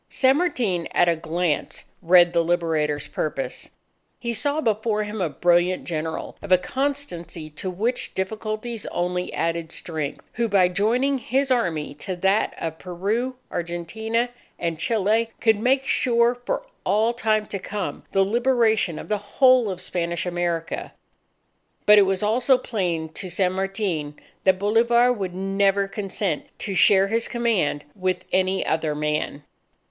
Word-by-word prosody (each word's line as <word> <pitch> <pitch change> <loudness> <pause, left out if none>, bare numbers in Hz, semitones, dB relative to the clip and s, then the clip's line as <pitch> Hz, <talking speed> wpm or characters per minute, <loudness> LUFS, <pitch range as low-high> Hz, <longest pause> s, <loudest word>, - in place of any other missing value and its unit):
San 265 +1 +3
Martin, 225 - 0
at 175 - +4
a 170 - +3
glance, 160 0 -2 0.2
read 175 0 +5
the 170 - +3
Liberator's 160 -4 0
purpose. 150 -3 -4 0.5
He 235 -1 -3
saw 285 +7 0
before 215 -4 0
him 210 0 -5
a 175 - +1
brilliant 175 +4 +2
General 160 -1 -4
"of 200 - -8
a 185 - +8
constancy 185 - -3
to 150 +5 -5
which 225 +7 -1
difficulties 215 +3 -3
only 180 +1 -2
added 165 -1 -2
strength," 155 -5 -4
who 235 0 0
by 190 -3 +4
joining 240 +9 +1
his 265 +2 0
Army 170 - 0
to 185 +6 -5
that 195 +4 +1
of 160 -1 -5
Peru, 210 +8 -2 0.2
Argentina, 220 +8 -2 0.3
and 165 -2 -3
Chile, 220 +2 +1
could 220 -2 +3
make 265 +4 +2
sure 235 -1 +3
for 245 0 -3 0.2
all 215 +4 +2
time 215 -2 +1
to 200 - -5
come, 200 +1 -5
the 195 - +3
liberation 225 -5 +2
of - - -8
the 210 -1 0
whole 250 +3 +4
of 185 -2 -4
Spanish 170 -1 -2
America. 175 -2 -2 0.9
But 210 0 +8
it 195 - +5
was 190 +1 0
also 245 +5 +3
plain 175 -10 -2
to 180 +4 -7
San 180 +1 +1
Martin 190 -6 -2 0.3
that 190 -1 +5
Bolivar 235 +4 +3
would 190 -6 -4
never 195 +1 +1
consent 195 -4 -3
to 200 - -4
share 190 +2 +5
his 225 +3 0
command 220 -12 0
with 185 -2 -2
any 185 0 +1
other 160 -1 0
man. 150 -1 -2
195 Hz, 150 wpm, -23 LUFS, 175-225 Hz, 0.9 s, a